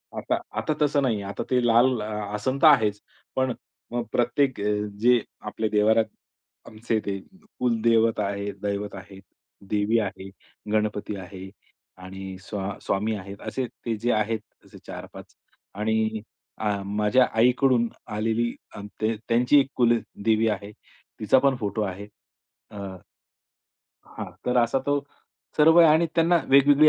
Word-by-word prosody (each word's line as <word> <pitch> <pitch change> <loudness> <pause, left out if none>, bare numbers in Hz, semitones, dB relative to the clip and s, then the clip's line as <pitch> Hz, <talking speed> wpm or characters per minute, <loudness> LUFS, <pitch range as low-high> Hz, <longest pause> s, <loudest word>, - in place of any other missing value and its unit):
आता, - - -1 0.2
आता 155 - 0
तसं 145 -1 +3
नाहीये. 115 -6 0
आता 100 - -4
ते 125 - +3
लाल 120 0 +4
आसन 105 +4 -3
तर 160 - +8
आहेच 105 -8 +4 0.3
पण 130 -2 +1 0.4
मग 120 -1 -1
प्रत्येक 125 +3 +2 0.5
जे 120 +2 +5 0.3
आपले 110 +1 -2
देव्हारात 110 +1 +3 0.6
आमचे 110 0 -2
ते 100 -1 -2 0.4
कुलदेवत 115 -2 +2
आहेत, 100 0 -2
दैवत 100 0 -3
आहे, 95 0 -11 0.5
देवी 105 +2 +2
आहे, 95 -2 -4 0.4
गणपती 105 -1 -1
आहे 95 0 -9 0.6
आणि 95 0 -8
स्वा 100 -1 -5
स्वामी 105 +3 -1
आहेत 100 0 -9
असे 130 -1 -2
ते 115 -1 -5
जे 120 +3 0
आहेत 110 +1 0 0.3
असे - - -15
4-5 - - -10 0.4
आणि 110 +1 0 0.4
अ, 110 - 0 0.2
माझ्या 105 +5 +3
आईकडून 125 0 +4 0.3
आलेली 115 +2 0 0.2
अ, - - -7 0.2
त्यांची 115 +5 +3
एक 135 - +1
कुलदेवी 115 -2 +1
आहे. 105 -1 -4 0.5
तिचा 110 +5 +4
पण 135 0 +3
फोटो 105 0 -2
आहे. 100 0 -4 0.6
अ 105 - -10 1.4
हां, - - -5 0.2
तर 125 0 +1
असा 120 +2 +3
तो 145 0 +2 0.6
सर्व 160 +2 +6
आहे 165 -1 +8
आणि 160 +2 +4
त्यांना 170 +1 +4
वेगवेगळी 140 +2 +6
110 Hz, 135 wpm, -25 LUFS, 105-125 Hz, 1.4 s, तर